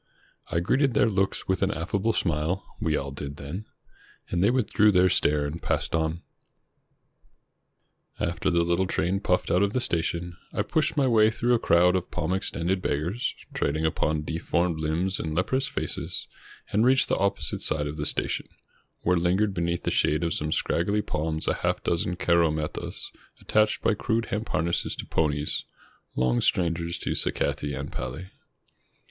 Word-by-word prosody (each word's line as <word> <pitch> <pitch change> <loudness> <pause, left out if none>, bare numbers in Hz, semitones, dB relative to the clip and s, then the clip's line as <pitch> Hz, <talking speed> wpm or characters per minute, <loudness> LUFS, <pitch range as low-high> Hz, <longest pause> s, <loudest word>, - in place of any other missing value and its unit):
I 85 - 0
greeted 135 - +2
their - - +4
looks 95 -2 0
with 95 -1 0
an 95 - +2
aflfable 100 +5 -1
smile, 85 +3 0
— - - -25
we 80 -2 +1
all 70 0 -4
did 70 +1 -6
then, 75 +9 -6 0.3
— - - -28
and 90 +1 +1
they 100 - +5
withdrew 110 -4 +3
their 90 -1 +5
stare 75 -3 +2
and 80 +3 -5
passed - - -1
on. 80 +1 0 2.0
After 85 +2 0
the 85 -1 +3
little 85 +2 +1
train 95 +1 0
puffed 90 -2 0
out 90 - +3
of 100 0 +1
the 130 - +2
station, 85 -5 -1 0.2
I - - 0
pushed 155 0 0
my 140 - +4
way 110 -3 +5
through 120 +2 +1
a 120 - +3
crowd 90 -1 +4
of 90 -1 -2
palm 90 +1 -2
extended 95 -1 -1
beggars, 85 - -1 0.2
trading 80 +3 0
upon 80 -1 0
deformed 85 +1 -1
Umbs 85 +5 0
and 80 -1 -3
leprous 130 +10 +1
faces, - - -3 0.4
and 105 - +3
reached 130 +2 +4
the - - +1
opposite 100 -7 -1
side 75 -2 0
of 75 +1 -5
the 75 -1 -1
station, - - -2 0.5
where 90 +1 +2
Hngered 95 +4 +2
beneath 85 -1 -1
the - - 0
shade 75 +3 +2
of 85 -2 0
some 75 +1 -1
scraggly 100 +8 +1
palms 80 -3 -2
a - - +3
half - - -1
dozen 85 +1 0
caromettas, 80 -3 0 0.3
attached 110 0 +1
by 115 - +4
crude 115 +2 0
hemp 105 +2 -2
harnesses 85 +2 0
to - - -6
ponies, 75 -1 0 0.5
long 60 -1 +2
strangers 85 -1 0
to - - -3
sacati 70 -2 -1
and 70 - -5
pali. 80 +9 -6
85 Hz, 170 wpm, -26 LUFS, 80-100 Hz, 2.0 s, they